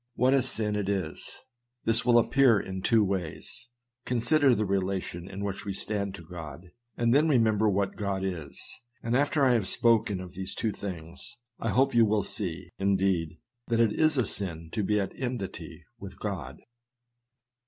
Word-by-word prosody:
What 130 +2 +3
a 135 - +4
sin 110 -4 -1
it 100 -2 -1
is! 95 -6 -3 0.5
This 115 0 +3
will 120 -1 +5
appear 120 -2 +4
in 95 -1 -5
two 110 +2 +4
ways. 95 +5 -4 0.4
Consider 125 +3 +3
the 110 - 0
relation 95 -2 -2
in 100 +1 -6
which 100 -1 -4
we 100 - -4
stand 100 0 -3
to 85 - -11
God, 85 +1 -9 0.3
and 120 0 +2
then 150 +4 +4
remember 110 -5 +3
what 100 0 -1
God 100 -2 -2
is; 90 -6 -5 0.4
and 115 +1 0
after 145 +1 +2
I 125 - +5
have 110 -5 +2
spoken 110 -4 +3
of 90 -1 -9
these 95 0 -5
two 110 - -1
things, 90 +3 -7 0.2
I 115 - -1
hope 135 +3 +2
you 115 -1 +6
will 105 -1 +1
see, 90 -3 -5
indeed, 95 -4 +1 0.3
that 115 -1 +1
it 115 -3 +3
is 155 -2 +2
a 125 - +2
sin 85 -5 -3
to 110 - -1
be 105 +1 +1
at 95 -1 -2
enmity 125 -7 -5 0.2
with - - -9
God. - - -5
105 Hz, 175 wpm, -28 LUFS, 95-120 Hz, 0.5 s, you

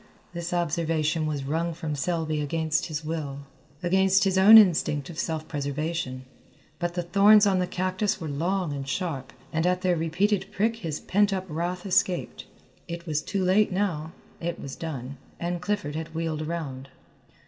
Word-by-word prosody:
This 170 0 -4
observation 160 -2 0
was 145 -3 -2
wrung 165 +4 -1
from 155 -2 -3
Selby 155 0 -1
against 160 +3 0
his 155 -1 -5
will, 150 -3 -4 0.4
against 190 +1 +3
his 190 -2 +2
own 200 +4 +9
instinct 170 -7 +4
of 165 - -8
self 160 -2 -2
preservation, 145 -2 -3 0.5
but 175 0 -2
the 175 - -1
thorns 205 +4 +6
on 195 -2 +3
the 180 - 0
cactus 185 +3 -1
were 160 - -5
long 170 +3 -1
and 135 -1 -5
sharp, 135 -3 -3 0.2
and 160 +2 +1
at 180 +1 0
their 180 -1 +3
repeated 180 +5 0
prick 225 +3 0
his 160 -8 -4
pent 205 +1 +2
up 190 -1 -2
wrath 175 +3 -3
escaped. 185 -2 0 0.4
It 170 0 -6
was 155 -3 -1
too 195 +2 -2
late 190 +3 +3
now; 175 -5 -1 0.3
it 170 0 -3
was 135 -1 -7
done, 140 -4 -6 0.2
and 175 0 -2
Clifford 185 -6 -2
had 160 0 -5
wheeled 160 -2 -2
around. 150 -5 -5
170 Hz, 170 wpm, -26 LUFS, 155-185 Hz, 0.5 s, own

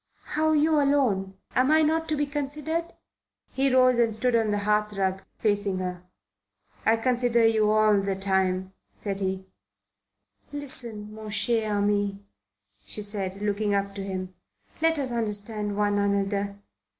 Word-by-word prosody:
"How 315 +1 +2
you 305 0 +3
alone? 235 -10 +1 0.2
Am 255 +1 +4
not 315 +1 +3
I - - -15
to 310 - 0
be 290 - +1
considered?" 300 +4 -3 0.6
He 270 0 +1
rose 255 -1 +4
and 230 -2 +2
stood 245 +2 +1
on 225 -2 +2
the 205 - +1
hearthrug, 200 -2 0 0.2
facing 205 -3 +1
her. 180 -1 -4 0.9
"I 225 +1 +5
consider 240 -1 +2
you 220 -2 +3
all 215 -1 +4
the 195 0 -1
time," 190 -1 0 0.2
said 200 -2 -3
he. 190 -1 -2 1.1
"Listen, 235 -7 -2
mon 215 0 -8
cher 215 +1 0
ami," 205 -1 0 0.6
she 210 - -3
said, 200 -1 -3
looking 205 0 0
up 200 0 -1
at 200 - -12
him. 185 -1 -5 0.5
"Let 325 0 +3
us 270 -3 -2
understand 210 -2 -1
one 205 -1 +1
another. 200 0 0
210 Hz, 145 wpm, -26 LUFS, 200-255 Hz, 1.1 s, I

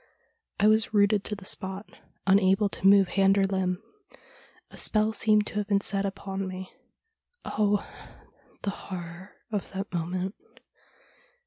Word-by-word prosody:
I 205 - +3
was 220 0 +3
rooted 205 0 +4
to 210 - -2
the 195 -2 -12
spot, 190 +2 -1 0.4
unable 195 +1 +4
to 195 - 0
move 195 -2 +6
hand 195 +1 +3
or 195 - +4
limb. 190 0 -1 0.9
A - - -12
spell 215 0 +2
seemed 215 -1 +3
to - - -8
have 205 - -3
been 200 -2 +3
set 200 0 0
upon 195 0 -5
me. 185 0 -7 0.7
Oh! 205 -1 +1 0.8
the 200 - 0
horror 180 -1 -9 0.2
of 205 -3 -3
that 195 0 -5
moment! 180 +3 -2
195 Hz, 140 wpm, -27 LUFS, 190-205 Hz, 0.9 s, move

